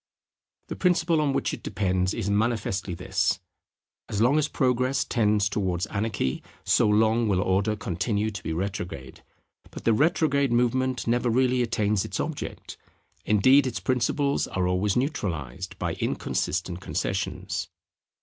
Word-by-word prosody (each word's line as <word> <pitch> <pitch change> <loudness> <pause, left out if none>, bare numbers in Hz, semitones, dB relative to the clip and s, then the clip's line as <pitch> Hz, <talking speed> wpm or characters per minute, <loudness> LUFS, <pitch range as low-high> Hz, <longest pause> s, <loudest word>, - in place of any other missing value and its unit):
The - - -4
principle 170 -3 +2
on 145 -2 +1
which - - -1
it - - -6
depends 95 -2 0
is 110 -4 -3
manifestly 100 -3 0
this: 95 +2 0 0.7
As 100 - -2
long 125 +7 +4
as 150 - +1
Progress 130 -1 +1
tends 105 -3 +2
towards 95 -3 -1
anarchy, 100 -10 -2 0.2
so - - +3
long 110 +2 +3
will 95 -3 +2
Order 100 +3 +1
continue 105 +2 -1
to 100 -4 -7
be 80 - -4
retrograde. 95 +1 -5 0.5
But - - -10
the 115 - +3
retrograde 140 0 +2
movement 125 +2 +1
never 120 +1 +1
really 125 +1 +2
attains 105 -4 +1
its - - -5
object: - - -5 0.5
indeed 130 +6 +5
its 120 -3 -3
principles 140 +3 0
are 90 -1 -1
always 95 +2 +1
neutralized 95 - -3
by - - -2
inconsistent 90 +1 -2
concessions. - - -3
110 Hz, 140 wpm, -26 LUFS, 95-125 Hz, 0.7 s, indeed